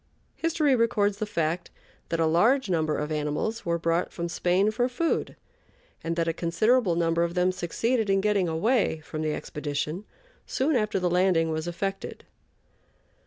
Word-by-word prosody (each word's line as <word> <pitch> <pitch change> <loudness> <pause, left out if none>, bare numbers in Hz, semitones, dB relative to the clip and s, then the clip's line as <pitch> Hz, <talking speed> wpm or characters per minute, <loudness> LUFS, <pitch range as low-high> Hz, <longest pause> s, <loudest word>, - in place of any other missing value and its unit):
History 310 -4 +2
records 210 -4 +1
the 215 - -3
fact 170 -1 -2 0.4
that 165 - -1
a 165 - +3
large 210 - +3
number 155 -3 +1
of 150 +1 -3
animals 155 +9 -2
were 170 0 +1
brought 165 +1 0
from 170 0 -4
Spain 180 +4 +2
for 245 +3 0
food, 325 +7 -1 0.7
and 165 0 -2
that 165 -1 0
a 165 - +1
considerable 185 +4 +2
number 165 0 +1
of 170 +1 -2
them 180 +1 +3
succeeded 215 +6 -1
in 195 0 +3
getting 200 -2 +1
away 175 0 +1
from 155 +1 -6
the 155 -1 -1
expedition 150 +5 -4 0.4
soon 285 +3 0
after 215 -4 +1
the 180 - 0
landing 175 -2 +2
was 160 +1 -3
effected. 195 +3 -4
180 Hz, 165 wpm, -26 LUFS, 165-215 Hz, 0.7 s, a